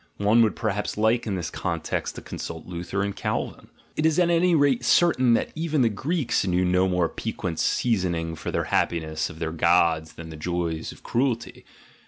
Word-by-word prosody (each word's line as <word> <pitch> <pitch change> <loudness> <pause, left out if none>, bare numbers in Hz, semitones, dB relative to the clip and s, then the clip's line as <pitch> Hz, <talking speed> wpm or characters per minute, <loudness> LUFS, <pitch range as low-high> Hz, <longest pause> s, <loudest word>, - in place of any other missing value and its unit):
One 105 +3 +4
would 110 -2 +3
perhaps 105 -2 -2
like 110 +2 +2
in 100 - -1
this 85 -3 -4
context - - -3
to - - -8
consult 80 -1 -7
Luther 90 +3 -3
and 100 -1 -3
Calvin. - - -3 0.3
It 155 - -1
is 160 -1 +3
at 175 -1 +3
any 170 +1 +3
rate 140 -5 +3
certain 130 -5 +4
that - - -1
even 155 -4 0
the 115 - +4
Greeks 135 - -1
knew 90 0 +2
no 90 +1 +3
more 90 -2 +2
piquant 80 0 -4
seasoning 90 -8 0
for 80 - -6
the - - 0
happiness 80 -2 -1
of 75 - -10
their 80 -1 -3
gods 85 -1 +2
than 80 0 -9
the - - -8
joys 85 0 -2
of - - -15
cruelty. 120 -1 -1
100 Hz, 190 wpm, -25 LUFS, 85-125 Hz, 0.3 s, One